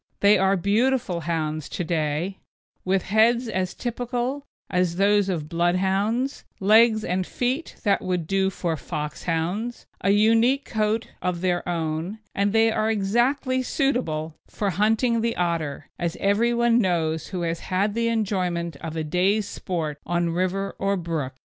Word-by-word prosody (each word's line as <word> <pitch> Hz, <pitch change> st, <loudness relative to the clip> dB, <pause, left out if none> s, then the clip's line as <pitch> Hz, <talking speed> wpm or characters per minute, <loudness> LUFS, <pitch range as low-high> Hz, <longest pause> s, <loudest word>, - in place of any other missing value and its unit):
They 205 Hz, +1 st, +6 dB
are 195 Hz, +1 st, +3 dB
beautiful 215 Hz, 0 st, +1 dB
hounds 155 Hz, -2 st, -2 dB
to 180 Hz, -, -3 dB
day, 160 Hz, +3 st, -1 dB, 0.4 s
with 190 Hz, 0 st, +1 dB
heads 235 Hz, +4 st, +3 dB
as 185 Hz, -4 st, -2 dB
typical 245 Hz, +3 st, -3 dB, 0.2 s
as 180 Hz, -2 st, 0 dB
those 200 Hz, +1 st, +3 dB
of 160 Hz, -5 st, -2 dB
Bloodhounds, 190 Hz, -, 0 dB, 0.2 s
legs 220 Hz, +2 st, +5 dB
and 185 Hz, -1 st, 0 dB
feet 255 Hz, -, -2 dB
that 200 Hz, -2 st, +2 dB
would 180 Hz, -3 st, -1 dB
do 195 Hz, +2 st, +1 dB
for 170 Hz, -3 st, -2 dB
Foxhounds, 165 Hz, +8 st, -3 dB, 0.2 s
a 195 Hz, -, +2 dB
unique 225 Hz, +6 st, +4 dB
coat 220 Hz, 0 st, -1 dB
of 180 Hz, -2 st, -2 dB
their 180 Hz, -1 st, +1 dB
own, 165 Hz, +3 st, -2 dB, 0.2 s
and 200 Hz, +1 st, +1 dB
they 225 Hz, +1 st, +4 dB
are 220 Hz, 0 st, 0 dB
exactly 240 Hz, +6 st, +1 dB
suitable 240 Hz, -, -1 dB
for 200 Hz, -2 st, -2 dB
hunting 225 Hz, +5 st, +2 dB
the 230 Hz, 0 st, 0 dB
otter, 165 Hz, -5 st, -2 dB
as 170 Hz, -1 st, -2 dB
everyone 235 Hz, +3 st, +3 dB
knows 165 Hz, -6 st, 0 dB
who 180 Hz, -2 st, -4 dB
has 165 Hz, 0 st, -1 dB
had 200 Hz, +3 st, 0 dB
the 230 Hz, +1 st, 0 dB
enjoyment 180 Hz, -8 st, -1 dB
of 160 Hz, +2 st, -6 dB
a 160 Hz, -, -1 dB
day's 190 Hz, +6 st, +1 dB
sport 160 Hz, -8 st, -4 dB
on 175 Hz, 0 st, 0 dB
river 185 Hz, +3 st, -1 dB
or 200 Hz, 0 st, +1 dB
brook. 160 Hz, -7 st, -3 dB
195 Hz, 150 wpm, -24 LUFS, 170-225 Hz, 0.4 s, They